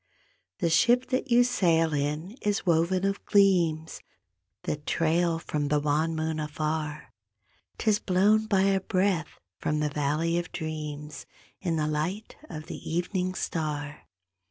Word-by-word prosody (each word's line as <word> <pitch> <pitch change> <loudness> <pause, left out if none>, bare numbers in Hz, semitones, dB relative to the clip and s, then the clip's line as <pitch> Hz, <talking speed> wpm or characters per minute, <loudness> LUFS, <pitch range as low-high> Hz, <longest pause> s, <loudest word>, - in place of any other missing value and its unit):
The 170 - 0
ship 240 +8 +4
that 260 +1 0
you 240 0 +6
sail 165 -9 +2
in 150 +5 -2
is 205 -1 -1
woven 175 +2 +2
of 195 0 -1
gleams 175 -6 +2 0.6
That 145 0 -4
trail 165 +1 +1
from 150 -3 -2
the 150 +1 +2
wan 150 +3 0
moon 160 0 -2
afar. 150 0 -3 0.6
'Tis 215 -2 +2
blown 210 +4 +3
by 195 -3 +3
a 195 -1 +2
breath 185 -4 0 0.2
from 150 0 -1
the 150 0 0
valley 150 +4 0
of 175 - -6
dreams 150 -2 -6 0.3
In 170 -3 -1
the 155 -1 0
light 160 +8 -3
of 155 0 -7
the - - -7
evening 180 +2 -1
star. 150 -4 -4
165 Hz, 140 wpm, -27 LUFS, 150-190 Hz, 0.6 s, you